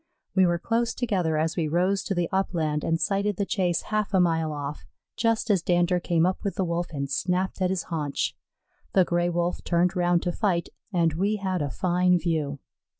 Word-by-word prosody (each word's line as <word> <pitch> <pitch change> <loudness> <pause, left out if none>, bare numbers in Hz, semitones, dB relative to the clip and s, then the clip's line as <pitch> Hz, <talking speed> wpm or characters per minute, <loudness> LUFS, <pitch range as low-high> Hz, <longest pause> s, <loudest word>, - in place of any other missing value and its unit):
We 190 -2 +5
were 175 0 +1
close 230 +6 0
together 185 -10 0
as 160 +1 0
we 165 -3 0
rose 180 +5 +1
to 195 - -1
the 175 -1 0
upland 160 -6 0
and 165 0 +1
sighted 200 +4 0
the 200 - 0
chase 180 -4 0
half 215 -2 -1
a - - +5
mile 165 -3 +2
off, 145 0 -5 0.3
just 230 0 +1
as 190 -4 +3
Dander 175 +1 +2
came 170 -1 +1
up 185 +1 0
with 200 - -2
the 195 - 0
Wolf 170 0 -1
and 140 -3 -3
snapped 180 +7 -1
at 185 - +2
his 185 -2 -1
haunch. 150 -5 -2 0.6
The 190 -2 +5
Gray 175 0 +1
wolf 175 +1 -1
turned 175 +2 +1
round 175 -1 +2
to 175 - 0
fight, 175 -3 0 0.2
and 170 -4 +2
we 200 +6 +1
had 190 -4 -2
a 145 - -1
fine 180 +4 +2
view. 155 -5 -1
175 Hz, 205 wpm, -26 LUFS, 165-190 Hz, 0.6 s, We